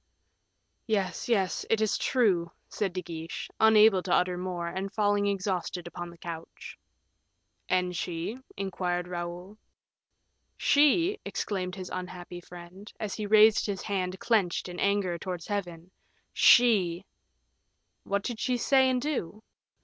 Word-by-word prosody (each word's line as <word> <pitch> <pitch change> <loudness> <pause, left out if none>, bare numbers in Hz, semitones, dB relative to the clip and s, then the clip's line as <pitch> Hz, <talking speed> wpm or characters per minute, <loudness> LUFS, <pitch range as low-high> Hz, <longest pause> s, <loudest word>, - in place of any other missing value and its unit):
"Yes, 200 -2 -1
yes, 195 -6 +1
it 225 - +2
is 215 -1 +1
true," 185 -10 +1 0.2
said 200 -3 -2
De 185 0 -4
Guiche, 165 0 -7
unable 215 -3 +6
to 180 - -5
utter 180 0 +2
more, 180 -1 -4
and 190 +3 -4
falling 205 -1 +1
exhausted 190 -3 -2
upon 175 0 -7
the 170 - -14
couch. 165 -1 -8 0.9
"And 180 -1 +1
she?" 175 +8 -4 0.2
inquired 180 -2 -2
Raoul. 180 +3 -6 1.0
"She," 330 +8 +3
exclaimed 185 -3 -3
his 185 -2 -7
unhappy 180 -1 -7
friend, 180 +4 -12
as 210 -2 -3
he 210 -2 -4
raised 215 +1 +6
his 200 -2 -3
hand 185 -2 -2
clenched 200 -8 +1
in 180 0 -7
anger, 200 -4 +1
towards 180 -1 -5
Heaven. 180 -4 -5 0.4
"She! 195 -7 +5 0.5
" - - -49
"What 200 0 -1
did 235 -2 -4
she 250 -1 0
say 265 +2 +4
and 255 -1 +1
do?" 245 - -3
190 Hz, 135 wpm, -28 LUFS, 175-215 Hz, 1.0 s, unable